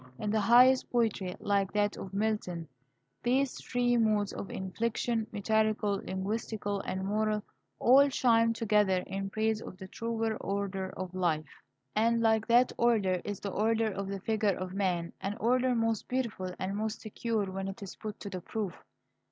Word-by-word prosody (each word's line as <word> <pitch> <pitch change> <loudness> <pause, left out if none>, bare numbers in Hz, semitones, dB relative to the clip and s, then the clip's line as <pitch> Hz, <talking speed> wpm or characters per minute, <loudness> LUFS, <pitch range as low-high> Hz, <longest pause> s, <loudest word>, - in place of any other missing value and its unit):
In 210 - -2
the 220 - +2
highest 250 +4 +6
poetry, 215 -6 0
like 200 -2 +1
that 205 0 +1
of 190 - -7
Milton, 195 -5 -2 0.5
these 260 +2 +1
three 245 -1 +1
modes 215 -3 +2
of - - -6
inflection, 225 +3 -2
metrical, 215 -1 +1
linguistical, 205 +1 -3
and 190 0 -2
moral, 210 +1 0 0.3
all 275 +4 +6
chime 230 -3 +3
together 210 -5 +2
in 195 0 -4
praise 220 +1 0
of 185 - -9
the 190 - -8
truer 225 +1 -2
order 195 -1 -3
of 185 -1 -5
life." 160 -5 -1 0.3
And 230 +2 +3
like 220 -1 +2
that 245 +2 +5
order 205 -7 +2
is 205 -2 -5
the 200 - -3
order 220 +2 +1
of 195 0 -4
the 195 0 -4
figure 210 -2 +1
of 185 0 -5
man, 180 -4 -1
an 200 +3 -3
order 250 +2 +2
most 225 -2 0
beautiful 235 -8 -2
and 190 +1 -3
most 215 +1 -3
secure 215 -2 -2
when 190 0 -4
it 195 +1 -6
is 195 - -8
put 215 -1 -7
to 200 - -5
the 185 -1 -5
proof. 200 0 -3
210 Hz, 170 wpm, -30 LUFS, 195-225 Hz, 0.5 s, highest